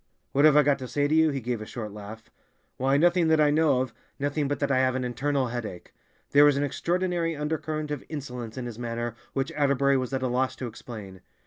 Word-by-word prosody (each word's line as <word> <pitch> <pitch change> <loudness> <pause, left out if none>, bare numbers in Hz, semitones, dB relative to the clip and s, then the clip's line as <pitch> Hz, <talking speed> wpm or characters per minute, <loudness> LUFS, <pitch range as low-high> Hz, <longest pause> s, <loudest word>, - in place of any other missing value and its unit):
"What 140 +2 +4
have 150 -1 +6
I 150 - +7
got 140 -1 +2
to 130 - -6
say 145 +3 0
to 150 - 0
you?" 160 0 +5
He 140 -2 -2
gave 120 -1 -3
a - - -5
short 110 -4 -6
laugh. 105 +2 -10 0.5
"Why, 135 +2 +2
nothing 175 +2 +4
that 160 -1 +4
I 150 -1 +5
know 150 -4 +3
of—nothing 140 +4 -3
but 145 - -1
that 140 -1 -1
I 130 - +3
have 130 -1 +2
an 130 - -1
internal 130 +2 -1
headache." 115 -7 -6 0.4
There 145 +1 +7
was 145 -1 +5
an 140 - +1
extraordinary 170 +2 -1
undercurrent 155 0 -3
of 145 -3 -3
insolence 125 -6 -6
in 125 - -4
his 120 -1 -7
manner 120 -1 -3 0.2
which 135 +3 -1
Atterbury 140 -2 +2
was 130 -1 -2
at 130 -1 -2
a - - +1
loss 130 +1 0
to 130 - -5
explain. 105 -5 -9
135 Hz, 230 wpm, -27 LUFS, 120-150 Hz, 0.5 s, I